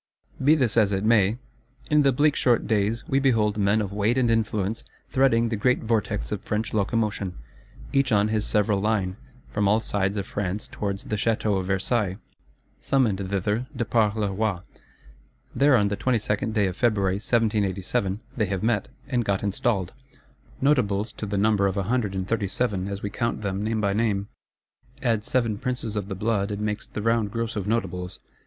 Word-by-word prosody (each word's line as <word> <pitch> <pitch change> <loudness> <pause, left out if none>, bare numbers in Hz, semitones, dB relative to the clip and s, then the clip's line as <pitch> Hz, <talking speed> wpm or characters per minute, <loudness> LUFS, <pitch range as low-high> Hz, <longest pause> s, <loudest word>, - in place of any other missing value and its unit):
Be 150 +4 +6
this 125 -7 +1
as 105 -3 +4
it 95 0 -1
may, 110 -1 +3 0.5
in 150 0 +5
the 140 -1 +4
bleak 145 +3 +3
short 120 -2 +2
days, 110 +1 0
we 135 - +2
behold 110 -6 +2
men 100 +2 +3
of 100 -2 -4
weight 105 +4 +1
and 120 -3 +3
influence 110 -1 0 0.3
threading 120 -3 +3
the 115 - -1
great 125 +5 +1
vortex 110 -2 -1
of 105 -2 -2
French 105 +1 -2
Locomotion, 105 -3 -1 0.6
each 135 -2 +2
on 105 0 +3
his 110 -1 0
several 105 -1 +1
line, 100 -3 0 0.3
from 105 -1 0
all 105 +2 +4
sides 100 -2 -1
of 100 - -2
France 100 +1 -3
towards 100 -1 -4
the 105 - -3
Château 105 -2 +1
of 95 - -4
Versailles: 95 0 0 0.6
summoned 105 -9 +1
thither 105 +5 -1
de 120 - -1
par 110 -2 +2
le 105 -2 -1
roi. 105 -3 -1 0.9
There, 140 0 +4
on 105 -2 +2
the 100 - -2
22d 110 -3 0
day 105 -2 +2
of 95 -2 -2
February 100 -4 +1
1787, 105 -2 0
they 105 -5 0
have 95 0 -3
met, 110 -3 +1 0.2
and 125 -4 0
got 100 -2 -1
installed: 100 -2 -1 0.7
Notables 115 -7 +2
to 105 - -6
the 100 0 -2
number 100 -1 +3
of 95 +1 -2
a 100 - +1
Hundred 105 -2 -1
and 95 0 -2
Thirty 105 -3 0
seven, 100 -3 -1
as 100 0 -5
we 100 - -3
count 115 +1 -2
them 100 0 -2
name 110 +1 -1
by 100 -2 +1
name: 105 -2 0 0.7
add 115 -4 +1
Seven 115 -4 0
Princes 125 -4 -3
of 100 -2 -2
the 95 - -4
Blood, 100 0 0
it 100 -1 -3
makes 105 0 -3
the 105 - -5
round 115 -2 +2
Gross 115 +1 -3
of 100 -2 -3
Notables. 90 -5 -2
105 Hz, 190 wpm, -25 LUFS, 100-115 Hz, 0.9 s, Be